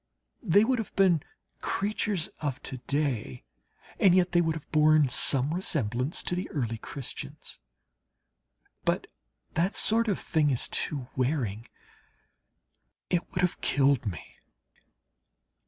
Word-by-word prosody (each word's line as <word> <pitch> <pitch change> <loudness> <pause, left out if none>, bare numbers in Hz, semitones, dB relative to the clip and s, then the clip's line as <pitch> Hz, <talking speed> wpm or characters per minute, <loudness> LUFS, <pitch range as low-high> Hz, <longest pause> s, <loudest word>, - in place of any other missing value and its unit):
They 200 +5 +4
would 255 0 +1
have 225 - -6
been 185 -6 +4 0.4
creatures 205 -3 -1
of 145 -4 -3
to 130 - -5
day 130 - -2 0.6
and 185 -3 +5
yet 180 -1 +3
they 175 - +4
would 160 -1 0
have 160 - -10
borne 155 -2 +4
some 135 +3 +4
resemblance 135 - -1
to - - -3
the 180 - -4
early 115 -6 -2
Christians. 135 +3 -7 1.2
But - - 0 0.5
that 175 +5 0
sort 230 +1 +3
of 200 - +1
thing 155 -3 +1
is 130 -4 +1
too 135 -5 -2
wearing, 125 -5 -1 1.4
it 175 -1 0
would 180 - -1
have 180 -1 0
killed 140 -4 +2
me. 85 -6 -7
155 Hz, 125 wpm, -28 LUFS, 130-180 Hz, 1.4 s, and